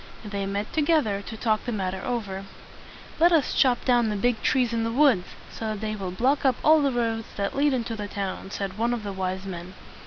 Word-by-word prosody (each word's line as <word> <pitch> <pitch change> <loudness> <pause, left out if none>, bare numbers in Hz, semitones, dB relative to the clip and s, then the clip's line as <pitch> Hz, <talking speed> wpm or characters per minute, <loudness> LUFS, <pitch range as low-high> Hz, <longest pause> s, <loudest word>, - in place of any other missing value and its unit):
They 200 -1 -3
met 200 +2 -3
together 295 -10 +2
to 220 +2 -8
talk 215 -1 +1
the 245 - -2
matter 190 -3 -2
over. 200 -6 -3 0.7
"Let 345 +2 +6
us 320 -5 +3
chop 250 -3 +3
down 240 -3 +3
the 210 - -1
big 240 +3 +1
trees 250 -3 +2
in 230 -1 0
the 230 - -1
woods, 250 -8 +4 0.2
so 225 - -6
that 215 -1 -3
they 215 0 -2
will 195 -3 -4
block 255 +10 +1
up 265 -3 +4
all 310 0 +6
the 280 -1 +2
roads 225 -2 -1
that 200 0 -2
lead 290 +1 +3
into 235 -3 -2
the 210 -1 -5
town," 195 -1 -4
said 195 0 -4
one 240 +1 +1
of 225 - -6
the 200 -1 -4
wise 190 0 -3
men. 180 0 -7
220 Hz, 225 wpm, -26 LUFS, 200-250 Hz, 0.7 s, Let